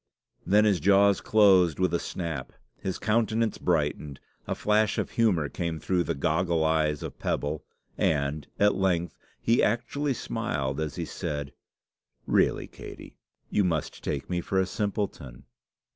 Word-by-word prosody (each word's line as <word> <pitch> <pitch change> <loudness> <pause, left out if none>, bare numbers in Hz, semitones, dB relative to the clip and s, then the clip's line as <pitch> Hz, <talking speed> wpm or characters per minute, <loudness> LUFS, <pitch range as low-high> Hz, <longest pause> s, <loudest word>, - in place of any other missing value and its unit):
Then 105 +2 +5
his 100 -4 +3
jaws 100 +3 +4
closed 95 -7 +5
with 95 -2 +1
a 85 - +2
snap, 80 -7 -5 0.3
his 95 - -3
countenance 110 +1 +1
brightened, 75 -4 -1 0.3
a - - -1
flash 105 0 +2
of - - -2
humour 95 -10 +2
came 85 +1 -3
through 90 +2 0
the 85 - -1
goggle 80 +3 +1
eyes 80 -2 +1
of - - -7
pebble, 75 +1 -2 0.4
and, 70 -1 0
at 105 0 +5
length, 90 -3 0 0.2
he 115 +1 +3
actually 125 +5 0
smiled 70 - -2
as 75 -3 -3
he - - -3
said 75 -2 -4 0.7
"Really, - - +2
Katey, - - -11 0.4
you 105 - +3
must 80 -5 -2
take 70 -2 -3
me 90 -1 -1
for 95 +2 0
a 95 - +2
simpleton!" 95 - -4
90 Hz, 145 wpm, -27 LUFS, 75-105 Hz, 0.7 s, Then